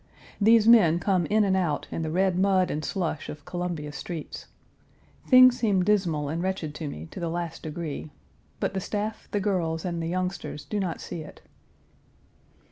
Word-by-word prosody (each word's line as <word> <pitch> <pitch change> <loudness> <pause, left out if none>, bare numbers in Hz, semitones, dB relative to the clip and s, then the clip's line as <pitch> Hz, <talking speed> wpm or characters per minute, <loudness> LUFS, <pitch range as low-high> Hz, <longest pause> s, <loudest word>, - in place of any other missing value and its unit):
These 220 +1 +5
men 195 -9 +7
come 180 -2 +1
in 215 +1 +3
and 195 -2 +2
out 175 -5 -1
in - - -3
the 160 - -2
red 185 +2 +1
mud 185 -1 +2
and 155 - -3
slush 170 -5 -3
of 150 -1 -9
Columbia 175 -4 -4
streets. 155 +2 -7 0.8
Things 255 -1 +7
seem 200 -6 +2
dismal 180 -7 +1
and 160 +4 -2
wretched 185 -5 -2
to 150 0 -5
me 80 - -7
to - - -7
the 170 - -2
last 170 -1 -4
degree, 155 -1 -5 0.5
but - - -1
the 190 - -1
staff, 210 +3 -4
the 205 - -1
girls, 175 -5 -1
and 170 -2 -2
the 165 - -3
youngsters 180 -4 -3
do 205 +8 -2
not 180 -4 -3
see 165 - -6
it. 155 - -12
180 Hz, 180 wpm, -26 LUFS, 160-195 Hz, 0.8 s, men